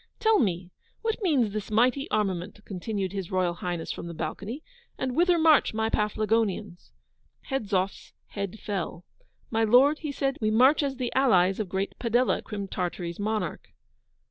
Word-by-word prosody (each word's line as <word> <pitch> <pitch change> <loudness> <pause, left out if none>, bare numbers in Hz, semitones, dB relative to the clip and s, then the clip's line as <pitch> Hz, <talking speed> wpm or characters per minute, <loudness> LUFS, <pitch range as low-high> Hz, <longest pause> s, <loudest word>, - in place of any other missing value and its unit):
'Tell 445 -2 +4
me, 180 -5 -1 0.3
what 450 +1 -1
means 275 - +2
this 215 -1 -4
mighty 250 +7 +2
armament,' 200 -1 -2
continued 195 0 -3
His 195 -3 -4
Royal 185 -2 +1
Highness 175 -1 -4
from - - -6
the 170 - -7
balcony, 200 - -5 0.3
'and 255 -1 -2
whither 350 +2 +4
march 315 -8 +4
my 220 0 0
Paflagonians?' 210 -3 -1 0.6
Hedzoff's 200 -7 -1 0.2
head 200 0 -5
fell. 180 -4 -4 0.5
'My 225 -1 +2
Lord,' 260 +7 +5
he 305 -3 -4
said, 275 0 -1
'we 215 - +2
march 255 +8 +5
as 275 -2 -1
the 250 -2 -3
allies 195 -8 +3
of 210 -4 -2
great 190 +2 -2
Padella, 240 +1 +2
Crim 205 -2 -5
Tartary's 175 -1 -4
monarch. 215 +1 -2
215 Hz, 155 wpm, -27 LUFS, 190-255 Hz, 0.6 s, Lord